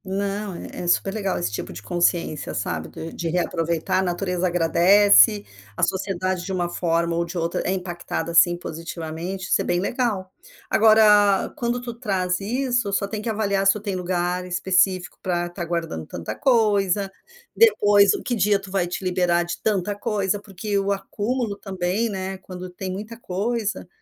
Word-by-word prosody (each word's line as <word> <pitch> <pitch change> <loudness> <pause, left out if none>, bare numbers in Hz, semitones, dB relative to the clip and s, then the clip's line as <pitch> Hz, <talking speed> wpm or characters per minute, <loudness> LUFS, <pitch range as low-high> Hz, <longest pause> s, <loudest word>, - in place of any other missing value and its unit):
Não, 200 0 -3
é - - -8
é 175 - -4
super 195 +2 +2
legal 200 -3 -1
esse 175 - -2
tipo 105 - -5
de 90 - -8
consciência, 170 - 0
sabe, 80 -1 -3
de 165 +1 -8
de 170 - -3
reaproveitar, 170 0 0
a - - +3
natureza 180 0 -1
agradece, 170 - +5 0.3
a - - -2
sociedade 185 -1 -1
de 190 - -5
uma 180 -2 0
forma 170 -1 0
ou 170 - +1
de 170 +2 -6
outra 170 0 -1
é - - -1
impactada 175 -2 -4
sim 175 +1 +5
positivamente, 165 +2 -6
isso - - +3
é - - -2
bem 175 - 0
legal. 200 -3 -2 0.4
Agora 210 -2 +5
quando 240 0 -1
tu 245 -1 -6
traz 190 -6 -1
isso, 245 +1 -1
só 200 0 0
tem 210 +1 -4
que 225 - -3
avaliar 200 -3 0
se 195 - +7
tu 210 - -5
tem 200 -2 -3
lugar 180 0 -1
específico 185 0 +1
pra 175 -1 -1
estar 175 0 -5
guardando 165 - -3
tanta 85 +5 -5
coisa, 205 - +2 0.4
depois 205 - +5
o - - -6
que 245 - -2
dia 205 -2 +2
tu 195 -1 -11
vai 190 -3 0
te 180 - -5
liberar 180 -1 +2
de 175 0 -6
tanta 205 -1 0
coisa. 205 -1 -1
Porque 200 0 -3
o 195 0 0
acúmulo 210 +3 -2
também, 190 +3 -2
né, 190 -1 -4
quando 185 -1 -9
tem 185 +1 -5
muita 215 +5 -7
coisa 210 0 -2
190 Hz, 175 wpm, -23 LUFS, 175-205 Hz, 0.4 s, se